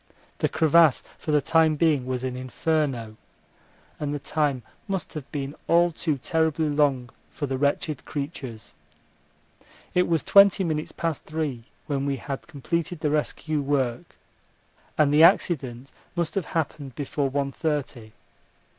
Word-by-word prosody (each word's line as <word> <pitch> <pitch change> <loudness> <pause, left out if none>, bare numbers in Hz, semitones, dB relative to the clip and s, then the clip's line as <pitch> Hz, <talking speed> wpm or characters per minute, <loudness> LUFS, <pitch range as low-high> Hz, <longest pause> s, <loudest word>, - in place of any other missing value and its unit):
The - - +1
crevasse 160 -2 +4 0.2
for - - -8
the 150 -2 +3
time 160 0 +4
being 150 -5 +2
was 130 -1 -2
an 130 -1 -2
inferno, 130 -3 -2 0.8
and 145 -1 -2
the 145 - -1
time 145 -3 -1 0.2
must 195 -2 -3
have 150 -4 -7
been 140 -1 -4
all 170 +1 +4
too 155 -2 -1
terribly 160 +2 0
long 140 -5 +1 0.2
for 145 - -4
the 135 -1 -2
wretched 140 +1 -1
creatures. 140 -6 -6 1.2
It 180 0 +3
was 165 -3 +1
twenty 200 -1 +6
minutes 155 -3 -2
past 165 -3 -3
three 150 -7 -3 0.2
when 140 -2 -1
we 140 - 0
had 135 +1 -6
completed 170 +2 -3
the 150 - +1
rescue 155 0 -1
work, 135 -4 -1 0.8
and 145 -2 +4
the 150 - +6
accident 135 - +3 0.2
must 170 -3 -1
have 195 -5 -1
happened 145 -5 -3
before 140 -1 -1
one 140 0 -1
thirty. 135 -8 -3
145 Hz, 145 wpm, -25 LUFS, 135-160 Hz, 1.2 s, twenty